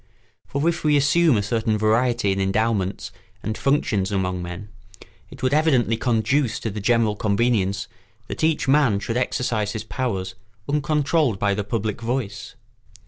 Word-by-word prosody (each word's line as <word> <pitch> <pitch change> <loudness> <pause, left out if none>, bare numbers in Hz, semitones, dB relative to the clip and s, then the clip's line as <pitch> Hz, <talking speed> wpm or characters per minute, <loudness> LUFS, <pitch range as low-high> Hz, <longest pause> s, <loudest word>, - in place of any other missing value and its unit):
For 140 +4 -1
if 170 -1 0
we 150 -1 +4
assume 145 -1 +4
a 100 - 0
certain 110 0 0
variety 115 0 +2
in 95 - -1
endowments 100 0 -1 0.3
and 110 +1 -2
functions 110 -9 0
among 90 -2 -1
men, 90 +4 -7 0.6
it - - -12
would 130 +1 +2
evidently 140 -7 +3
conduce 120 +2 0
to 110 - -3
the 105 +1 -5
general 115 0 +2
convenience 100 -2 0 0.4
that - - -5
each 160 -3 +1
man 135 -7 +3
should 115 +3 -4
exercise 115 -4 -1
his 110 -1 -4
powers 100 -4 -3 0.3
uncontrolled 150 - +1
by 100 +1 +1
the 105 +1 -2
public 110 +1 -3
voice. 120 -2 -4
115 Hz, 150 wpm, -23 LUFS, 100-135 Hz, 0.6 s, we